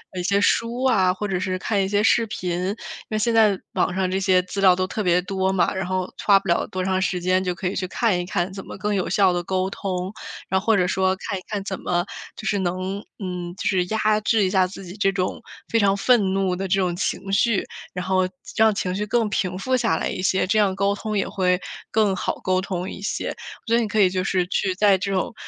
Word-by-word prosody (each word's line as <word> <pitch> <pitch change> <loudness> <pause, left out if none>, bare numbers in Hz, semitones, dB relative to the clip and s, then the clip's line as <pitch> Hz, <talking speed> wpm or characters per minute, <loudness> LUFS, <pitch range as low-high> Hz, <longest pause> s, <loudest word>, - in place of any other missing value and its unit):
一 180 - -2
些 200 +2 +2
书 230 +4 +1
啊， 195 -8 +4
或 205 +3 -3
者 190 -2 -1
是 185 0 -2
看 200 +1 0
一 - - -1
些 205 +1 +1
视 230 +1 +3
频。 185 -4 -4 0.2
因 205 - -2 0.3
为 215 - -1
现 230 +2 +1
在 215 -4 +4
网 180 - 0
上 190 -1 0
这 190 - 0
些 185 -1 +4
资 195 +2 -4
料 185 -2 +6
都 185 0 0
特 215 - -4
别 180 -2 +3
多 190 0 0
嘛， 190 -2 +1
然 190 -1 -3
后 185 0 -1 0.2
花 200 -1 +6
不 195 - -11
了 170 - +1
多 185 0 -3
长 190 0 +1
时 185 -1 0
间， 185 +1 +1
就 180 -1 -2
可 180 - -3
以 190 - -2
去 185 -1 -2
看 200 -2 +1
一 - - -2
看 180 0 -2
怎 195 0 -7
么 - - -9
更 205 +2 -1
有 190 -3 -1
效 190 -3 +3
地 175 - 0
沟 190 +1 -1
通。 185 0 -3 0.3
然 190 0 +1
后 - - -15
或 220 - +5
者 180 - +3
说 190 0 +1
看 195 - -2
一 - - -13
看 205 -3 -3
怎 195 -1 -4
么 175 0 0 0.3
就 215 - -9
是 205 -2 +1
能 185 +2 -2
嗯， 180 -2 -5
就 - - -3
是 185 -3 +2
压 215 +1 +1
制 215 -1 +2
一 185 - +2
下 185 -2 +3
自 195 0 -10
己 180 +3 -9
这 195 -2 +2
种 185 -1 -2 0.3
非 230 - +2
常 200 -1 +3
愤 200 -4 +3
怒 190 -2 +1
的 190 +1 -3
这 195 +2 +2
种 180 -2 0
情 195 +1 -2
绪。 220 0 +2 0.3
然 180 0 -3
后 185 -1 +2 0.3
让 220 -1 +5
情 180 -2 -1
绪 210 +1 -2
更 230 0 +1
平 180 -1 -1
复 255 +7 0
下 235 -3 +1
来 - - -1
一 - - -4
些， 190 0 +2
这 215 +2 +2
样 195 -2 +2
沟 200 +1 +1
通 215 0 -3
也 195 - 0
会 180 -2 +1 0.3
更 210 -3 +2
好 - - -2
沟 185 0 +2
通 185 -1 -4
一 - - -8
些。 205 - -2
我 - - -9
觉 230 - +3
得 235 - +4
你 220 - -1
可 215 +1 -1
以 190 -2 +6
就 185 0 -1
是 185 -2 +1
去 190 0 0
在 200 0 +4
这 195 +1 -3
种 190 +4 -1
190 Hz, 285 characters per minute, -23 LUFS, 185-205 Hz, 0.3 s, 料